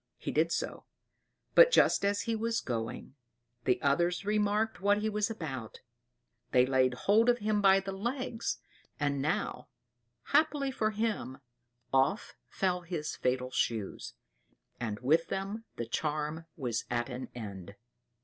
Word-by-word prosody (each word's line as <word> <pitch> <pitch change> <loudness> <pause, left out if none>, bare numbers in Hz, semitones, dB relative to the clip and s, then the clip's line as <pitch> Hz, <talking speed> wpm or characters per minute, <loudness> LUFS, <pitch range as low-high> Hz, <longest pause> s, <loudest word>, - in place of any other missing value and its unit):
He - - -4
did - - +2
so; - - -3 0.7
but - - +9
just - - +4
as 200 0 +2
he 230 -1 -1
was 230 +1 0
going, 115 +1 -4 0.5
the 125 - +3
others 175 +7 +2
remarked 210 +1 +1
what 205 +1 +4
he 215 +1 0
was 210 0 0
about; 135 - -6 0.7
they 125 0 +5
laid 130 -1 +2
hold 220 +4 +5
of 240 - +4
him 210 -2 0
by 195 -1 +6
the 195 0 -5
legs; 235 +3 -3 0.4
and 140 -2 0
now, 150 +3 -1 0.6
happily 295 -3 +2
for 220 -5 0
him, 215 - -2 0.6
off 135 +10 +2
fell 180 -2 0
his 165 -3 -4
fatal 125 0 -1
shoes 110 -6 -2 0.6
and 110 -3 -3
with 160 +6 +3
them 200 +4 -4
the 120 - -3
charm 150 +5 -2
was 120 -6 -2
at 120 -1 0
an 125 0 -6
end. 100 -4 -7
175 Hz, 140 wpm, -31 LUFS, 130-215 Hz, 0.7 s, but